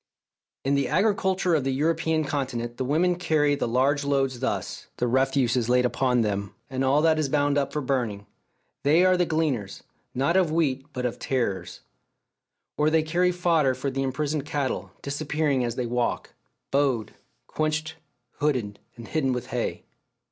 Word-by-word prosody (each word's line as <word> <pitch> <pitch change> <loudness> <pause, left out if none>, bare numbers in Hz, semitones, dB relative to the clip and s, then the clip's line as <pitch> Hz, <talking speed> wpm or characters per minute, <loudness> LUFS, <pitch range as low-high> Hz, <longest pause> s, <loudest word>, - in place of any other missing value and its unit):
In 135 - +2
the 140 0 +2
agriculture 190 0 +1
of 155 -4 +2
the 135 - -1
European 160 +2 +1
Continent 130 -5 -3
the 130 - -1
women 170 +7 +2
carry 155 -4 +2
the 145 - -1
large 135 +4 +2
loads 135 -3 0
thus, 135 - -3
the 125 - 0
refuse 130 0 +2
is 120 -2 0
laid 125 0 +4
upon 125 0 +1
them, 100 -2 -2 0.2
and 130 0 -1
all 140 +3 +3
that 160 -1 +4
is 150 -3 0
bound 145 0 +2
up 140 -1 0
for 150 - -2
burning; 120 -7 -1 0.6
they 160 +6 +4
are 185 0 +5
the 180 -1 +1
gleaners, 140 -11 -1 0.3
not 140 +7 +1
of 185 -4 +3
wheat 140 -4 0
but 125 -2 -4
of 125 - -3
tares. 120 -8 -2 1.0
Or 150 +1 +4
they 160 0 +3
carry 175 +3 +2
fodder 165 -7 +2
for 135 +2 -3
the 135 +1 -2
imprisoned 145 +2 -1
cattle, 145 -3 -3
disappearing 140 -1 0
as 120 -1 -2
they 125 - -2
walk, 120 0 -2 0.4
bowed, 135 -6 +1 0.3
quenched, 155 0 -2 0.5
hooded, 125 -9 -1 0.2
and 115 -2 -9
hidden 135 -5 0
with 125 +1 -5
hay. 120 - -2
140 Hz, 170 wpm, -26 LUFS, 125-155 Hz, 1.0 s, are